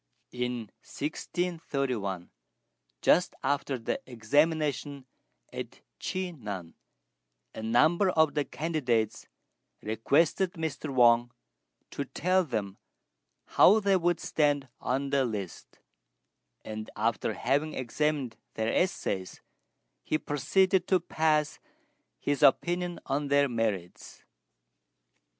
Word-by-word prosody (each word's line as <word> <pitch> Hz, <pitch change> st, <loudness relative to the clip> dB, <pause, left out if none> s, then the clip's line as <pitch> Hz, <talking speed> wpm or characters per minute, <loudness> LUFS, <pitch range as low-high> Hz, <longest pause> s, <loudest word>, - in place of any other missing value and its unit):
In 125 Hz, -3 st, -3 dB
1631, 140 Hz, -, -3 dB, 0.7 s
just 180 Hz, -, +4 dB
after 140 Hz, 0 st, 0 dB
the 115 Hz, -, -3 dB
examination 145 Hz, +3 st, 0 dB, 0.5 s
at -, -, -7 dB, 0.2 s
Chi 185 Hz, -1 st, -2 dB
nan, 100 Hz, -, -7 dB, 0.8 s
a -, -, -7 dB
number 155 Hz, -, +3 dB
of 160 Hz, -4 st, +3 dB
the 145 Hz, 0 st, +1 dB
candidates 130 Hz, -10 st, -1 dB, 0.6 s
requested 145 Hz, -, +2 dB
Mr. 160 Hz, -2 st, -4 dB
Wang 120 Hz, -2 st, +5 dB, 0.6 s
to 140 Hz, -, -3 dB
tell 185 Hz, +7 st, +1 dB
them 105 Hz, -, -4 dB, 0.7 s
how 210 Hz, +4 st, +6 dB
they 200 Hz, -2 st, +3 dB
would 175 Hz, -2 st, +1 dB
stand 145 Hz, -3 st, +1 dB
on 135 Hz, +2 st, -1 dB
the 140 Hz, -1 st, +3 dB
list; 105 Hz, -7 st, -5 dB, 0.9 s
and, 110 Hz, 0 st, -6 dB
after 110 Hz, +2 st, 0 dB
having 145 Hz, +5 st, 0 dB
examined 135 Hz, -1 st, -1 dB, 0.2 s
their 110 Hz, +1 st, -1 dB
essays, 95 Hz, -, -1 dB, 0.6 s
he -, -, 0 dB
proceeded 175 Hz, +6 st, +1 dB
to 185 Hz, -, +4 dB
pass 155 Hz, -2 st, 0 dB, 0.6 s
his 145 Hz, -1 st, -1 dB
opinion 175 Hz, +5 st, +3 dB
on 140 Hz, +2 st, -1 dB
their 140 Hz, 0 st, +4 dB
merits. 110 Hz, -8 st, -3 dB
140 Hz, 100 wpm, -29 LUFS, 115-160 Hz, 0.9 s, how